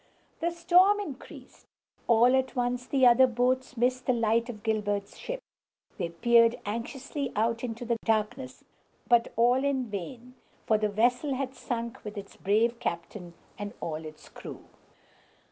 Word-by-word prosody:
The 340 - 0
storm 355 +4 +4
increased. 310 -10 -10 0.4
All 240 +2 +5
at 260 -1 0
once 245 0 -1
the 265 -2 +3
other 250 +2 +7
boats 255 +1 0
missed 250 +2 0
the 255 - +4
light 230 +1 +1
of 215 -4 -8
Gilbert's 205 -3 -1
ship! - - -5 0.6
They 175 -2 -1
peered 230 +7 +4
anxiously 255 +5 -4
out 230 +2 0
into 240 0 -5
the 235 0 0
darkness, 225 +4 -1 0.4
but 240 -1 +3
all 245 +3 +3
in 265 -5 -1
vain, 235 +6 -7 0.3
for 215 -1 +2
the 215 -1 +1
vessel 245 +6 +1
had 265 0 -3
sunk 235 -2 -5
with 210 0 -7
its 200 0 -8
brave 230 +4 +1
captain 170 0 -5 0.2
and 205 +2 -6
all 160 -1 -4
its 155 -1 -11
crew. - - -10
235 Hz, 150 wpm, -28 LUFS, 215-255 Hz, 0.6 s, other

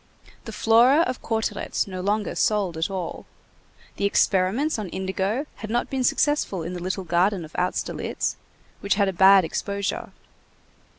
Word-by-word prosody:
The - - -6
Flora 240 +7 +4
of 255 -7 -2
Cauteretz 220 -2 -2
no 185 -2 -6
longer 205 +2 -1
sold 200 -5 +1
at 160 +4 -1
all. 185 -3 -5 0.7
The - - 0
experiments 200 +8 +1
on 205 -4 -5
indigo 190 - -2
had 215 - -7
not 240 +2 -1
been 265 -1 -1
successful 250 - +1
in 170 +3 -5
the 180 - -6
little 185 +2 -3
garden 175 +1 +1
of 155 - -15
Austerlitz, 180 +1 -2 0.4
which 200 -1 0
had 200 -1 +2
a - - -3
bad 190 0 +6
exposure. 200 +4 -3
200 Hz, 155 wpm, -24 LUFS, 185-220 Hz, 0.7 s, bad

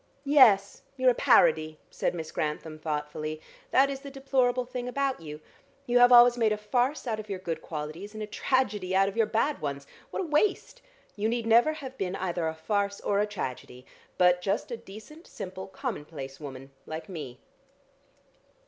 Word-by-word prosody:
"Yes; 235 -9 +5 0.2
you're 255 -1 +5
a - - 0
parody," 160 - +3
said - - -1
Miss 160 -2 -6
Grantham 155 +1 -3
thoughtfully. 155 0 -4 0.3
"That 270 +1 +5
is 270 - -5
the 280 0 -9
deplorable 265 -2 0
thing 250 0 -5
about 270 -3 -1
you. 150 -1 -8 0.4
You 245 -1 +3
have 245 0 +7
always 240 0 +8
made 220 -2 +3
a 210 - +1
farce 245 +8 0
out 220 -3 -2
of 215 -1 -8
your 195 - -3
good 165 -3 -4
qualities, 160 +7 -7
and 215 - -4
a - - -2
tragedy 210 -5 0
out 195 +1 +4
of 195 - -4
your 225 -2 +2
bad 235 - 0
ones. 140 -1 -4 0.2
What - - -3
a - - -4
waste! 390 +10 0 0.3
You 215 +1 0
need 235 0 -1
never 235 +7 +5
have 265 -4 -9
been 190 -1 -2
either 175 -3 -2
a 160 - -3
farce 200 +5 -1
or 200 - +1
a 210 - +1
tragedy, 130 -9 -6 0.3
but 180 -1 +4
just 200 +6 -2
a - - -2
decent, 230 - -13
simple, 190 0 -7
commonplace 155 - -6
woman 135 -2 -9 0.2
like 160 +4 -6
me." 150 -10 -7
205 Hz, 185 wpm, -28 LUFS, 160-245 Hz, 0.4 s, always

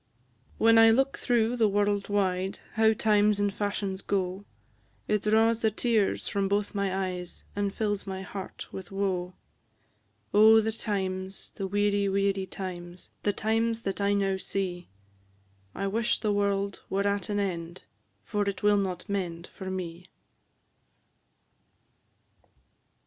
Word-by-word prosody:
When 225 0 +6
I 225 0 +8
look 270 +4 +3
through 240 0 +1
the 225 -2 +4
world 205 0 +1
wide, 190 -2 0 0.2
How 220 0 +4
times 210 -1 +3
and 205 -1 +1
fashions 200 -2 -2
go, 190 0 -2 0.6
It 210 -1 +1
draws 225 +2 +3
the 220 - +3
tears 220 -2 0
from 200 -1 0
both 205 +1 0
my 195 -2 0
eyes, 180 -1 -8
And 200 -1 0
fills 205 -1 -2
my 190 0 -4
heart 190 0 -7
with 190 -1 -8
woe: 185 -2 -2 1.0
Oh, 220 +2 +8
the 220 0 0
times, 190 -3 -4
the 195 - -4
weary, 205 0 +1
weary 195 0 +1
times! 175 -2 -7
The 205 - +2
times 225 +2 0
that 195 +1 -2
I 200 0 +2
now 195 -1 +1
see; 185 -2 -3 0.9
I 195 - -2
wish 225 +4 +1
the 210 -2 0
world 200 -1 0
were 200 +1 0
at 200 -1 -1
an 205 0 0
end, 175 -3 -3 0.4
For 205 -1 -1
it 195 0 -6
will 205 0 +5
not 185 -2 -2
mend 175 -4 -3
for 190 - -6
me! 180 -1 -5
200 Hz, 140 wpm, -28 LUFS, 190-210 Hz, 1.0 s, I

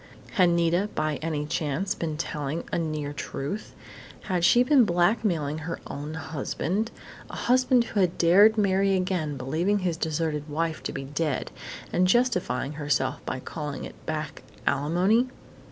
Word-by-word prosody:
_ - - -18
Had 180 -2 +4
Nita, 170 +4 +2
by 155 -1 0
any 155 -2 -2
chance, 155 +4 -1
been 155 -2 -3
telling 150 0 -3
a - - 0
near 155 -3 -3
truth? 145 +7 -5 0.5
Had 180 -4 -1
she 240 +7 +6
been 260 0 +5
blackmailing 175 -5 +1
her 165 +2 -5
own 150 +2 -6
husband 160 +7 -2 0.4
a - - -7
husband 250 0 +3
who 225 -3 -3
had 180 -3 +2
dared 200 +6 +6
marry 195 -1 +3
again, 180 -6 -1
believing 160 +11 0
his 170 -2 0
deserted 155 -2 -2
wife 160 +1 -1
to - - -3
be - - -5
dead 145 0 -2 0.4
and 185 +1 +3
justifying 185 - +1
herself 145 -3 -1
by 130 - -2
calling 150 +1 -5
it - - -12
"back 155 -1 -4 0.2
alimony?" 180 - +2
165 Hz, 155 wpm, -26 LUFS, 150-195 Hz, 0.5 s, she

